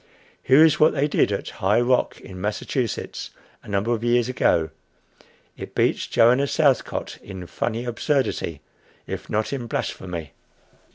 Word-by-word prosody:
Here 140 +5 +6
is 155 -2 +3
what 155 - +5
they 145 +1 +2
did 145 - +2
at 100 - -3
High 105 +4 +3
Rock, 125 +1 +1
in 95 -1 -10
Massachusetts, 110 +4 -3 0.3
a - - -17
number 100 +3 0
of 115 -1 -3
years 120 0 +2
ago. 85 -10 +1 0.8
It - - -9
beats - - +1
Joanna 125 +5 +4
Southcott 140 -4 0
in 95 -2 -8
funny 115 +7 -3
absurdity, 120 - -1 0.4
if - - -6
not 110 +5 -1
in 125 -4 -4
blasphemy. 85 -8 -4
120 Hz, 145 wpm, -23 LUFS, 100-130 Hz, 0.8 s, Here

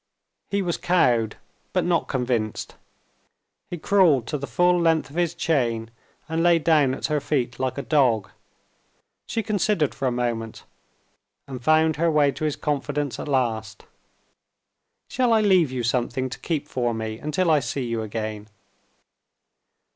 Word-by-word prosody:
He 200 -1 0
was 175 -2 -1
cowed, 125 -11 +2 0.4
but - - +1
not 175 -2 +1
convinced; 120 -5 -2 1.0
he 175 - -4
crawled 165 - +3
to 150 - -1
the 140 - -5
full 175 +8 +2
length 160 -3 +1
of - - -13
his 175 -1 0
chain, 120 -10 0 0.4
and 160 0 -1
lay 170 0 +5
down 150 -5 +3
at - - -5
her 150 -1 +1
feet 130 -4 -2
like 130 0 -2
a 140 - -3
dog. 115 -10 +2 1.0
She 225 - -2
considered 205 -6 0
for 135 -1 -2
a - - +1
moment 120 -2 -3 0.8
and 130 -3 -7
found 155 +1 +3
her 170 +2 +2
way 150 -3 +3
to 155 - -4
his 150 - 0
confidence 145 -1 -2
at - - -5
last. 115 -6 -1 1.2
"Shall 250 -2 +1
I 220 - +4
leave 185 -9 +4
you 125 -2 -3
something 125 +2 -1
to - - -7
keep 155 -3 -3
for 120 -4 -1
me 110 0 -4
until 160 +3 0
I 155 - +5
see 135 -1 -3
you 115 -1 -2
again?" 110 -1 -5
140 Hz, 155 wpm, -24 LUFS, 120-165 Hz, 1.2 s, lay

